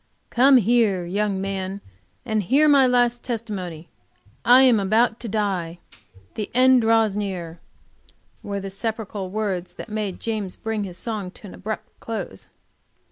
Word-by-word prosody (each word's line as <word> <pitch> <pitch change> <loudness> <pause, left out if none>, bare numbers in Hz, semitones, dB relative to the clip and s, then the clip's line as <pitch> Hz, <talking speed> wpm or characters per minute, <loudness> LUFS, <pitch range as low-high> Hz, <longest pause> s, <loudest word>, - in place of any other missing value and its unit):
"Come 265 +2 +6
here, 220 -5 +2
young 200 +2 -1
man, 195 0 -3 0.5
and 220 -3 0
hear 275 - +3
my 280 -3 +6
last 245 -1 +2
testimony. 195 -9 -5 0.6
I 250 +3 +7
am 245 -5 +5
about 220 +4 +2
to 235 - -6
die. 190 -5 -2 0.6
The 215 - -4
end 255 0 +6
draws 225 -2 +3
near," 180 -5 -4 0.8
were 200 -1 -4
the 195 0 -6
sepulchral 210 -2 -4
words 195 -3 -3
that - - -9
made 210 -3 -4
him 215 -3 -2 0.2
bring 220 -2 -2
his 180 -2 -8
song 215 -5 -4
to 195 - -14
an - - -11
abrupt 215 +2 -7
close. 200 - -6
210 Hz, 145 wpm, -23 LUFS, 190-230 Hz, 0.8 s, I